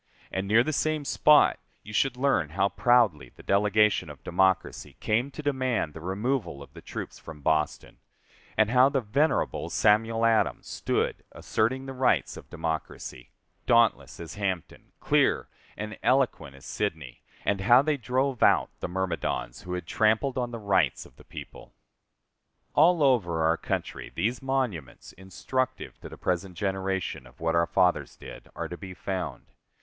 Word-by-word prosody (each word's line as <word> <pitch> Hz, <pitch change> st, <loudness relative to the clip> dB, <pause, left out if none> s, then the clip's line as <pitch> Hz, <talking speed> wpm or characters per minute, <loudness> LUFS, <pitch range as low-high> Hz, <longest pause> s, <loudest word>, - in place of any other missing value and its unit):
And 95 Hz, +1 st, -2 dB
near 110 Hz, +4 st, +5 dB
the 155 Hz, -, -2 dB
same 155 Hz, 0 st, 0 dB
spot 150 Hz, +1 st, +5 dB, 0.2 s
you 105 Hz, -, -10 dB
should 125 Hz, +3 st, +1 dB
learn 125 Hz, -, +1 dB
how 100 Hz, +1 st, +3 dB
proudly 110 Hz, -, +2 dB
the -, -, -15 dB
delegation 105 Hz, -2 st, +2 dB
of 75 Hz, -2 st, -12 dB
democracy 95 Hz, +1 st, 0 dB
came 120 Hz, +6 st, 0 dB
to 150 Hz, +2 st, -9 dB
demand 130 Hz, -, -1 dB
the 80 Hz, -, -9 dB
removal 95 Hz, -, -2 dB
of -, -, -17 dB
the -, -, -11 dB
troops -, -, -7 dB
from 80 Hz, -2 st, -11 dB
Boston, 75 Hz, 0 st, -1 dB, 0.6 s
and 110 Hz, 0 st, +3 dB
how 130 Hz, +2 st, +6 dB
the 140 Hz, -2 st, 0 dB
venerable 140 Hz, +9 st, 0 dB
Samuel 115 Hz, +2 st, +2 dB
Adams 115 Hz, -1 st, +2 dB
stood -, -, -2 dB
asserting 130 Hz, +5 st, -1 dB
the 135 Hz, -, -6 dB
rights 130 Hz, 0 st, +1 dB
of -, -, -12 dB
democracy, 80 Hz, -6 st, -5 dB, 0.4 s
dauntless 115 Hz, -2 st, +3 dB
as 85 Hz, -, -7 dB
Hampden, 95 Hz, -4 st, -4 dB
clear -, -, +2 dB, 0.3 s
and 105 Hz, 0 st, -5 dB
eloquent 130 Hz, -, +1 dB
as 70 Hz, -, -15 dB
Sidney; 80 Hz, -12 st, -4 dB, 0.2 s
and 100 Hz, -1 st, 0 dB
how 120 Hz, +6 st, +6 dB
they 155 Hz, 0 st, +1 dB
drove 130 Hz, 0 st, -1 dB
out -, -, +4 dB
the -, -, -3 dB
myrmidons 90 Hz, -8 st, -3 dB
who 90 Hz, -, -6 dB
had 90 Hz, -2 st, -4 dB
trampled 110 Hz, -, +1 dB
on 125 Hz, -2 st, -1 dB
the 120 Hz, -, -6 dB
rights 95 Hz, -, +1 dB
of -, -, -18 dB
the -, -, -16 dB
people. -, -, -11 dB, 1.0 s
All 165 Hz, +1 st, +5 dB
over 90 Hz, -, +2 dB
our 80 Hz, +1 st, +3 dB
country, -, -, -4 dB
these 115 Hz, +8 st, -1 dB
monuments, 130 Hz, -, -3 dB
instructive 95 Hz, +8 st, -4 dB
to -, -, -9 dB
the -, -, -11 dB
present 90 Hz, 0 st, -2 dB
generation, 95 Hz, -5 st, -2 dB
of -, -, -20 dB
what 80 Hz, 0 st, 0 dB
our 85 Hz, 0 st, +2 dB
fathers 90 Hz, -2 st, +1 dB
did, -, -, -11 dB
are -, -, -4 dB
to 90 Hz, -, -7 dB
be 95 Hz, -2 st, -9 dB
found. 95 Hz, -1 st, -4 dB
105 Hz, 160 wpm, -27 LUFS, 90-125 Hz, 1.0 s, how